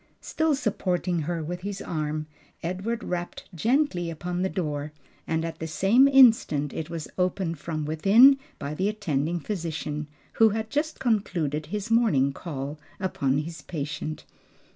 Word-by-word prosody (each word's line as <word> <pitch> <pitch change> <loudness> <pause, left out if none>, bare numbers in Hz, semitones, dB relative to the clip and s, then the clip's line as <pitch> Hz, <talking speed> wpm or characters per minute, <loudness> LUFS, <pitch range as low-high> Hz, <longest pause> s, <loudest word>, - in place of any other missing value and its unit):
Still 315 -2 +1
supporting 185 -8 -1
her 165 +1 -2
with 175 +3 -5
his 200 0 -4
arm, 155 -3 -3 0.4
Edward 195 +7 -2
rapped 175 -1 -4
gently 215 - +1
upon 175 +2 -3
the 190 - +1
door, 150 -5 -3 0.3
and 160 0 0
at 165 -1 -6
the 160 - -3
same 210 - +4
instant 230 - +5
it 160 0 -4
was 165 -2 -5
opened 180 -3 0
from 155 -2 -3
within 210 - +6 0.2
by 140 +1 -4
the 190 +6 0
attending 170 -6 -1
physician, 155 -5 -4 0.3
who 225 - +8
had 220 +1 -3
just 310 +2 -1
concluded 175 - 0
his 210 +5 -4
morning 175 - +3
call 145 -2 -6 0.2
upon 140 -8 0
his 160 +3 -4
patient. 150 -1 -5
175 Hz, 145 wpm, -26 LUFS, 155-210 Hz, 0.4 s, who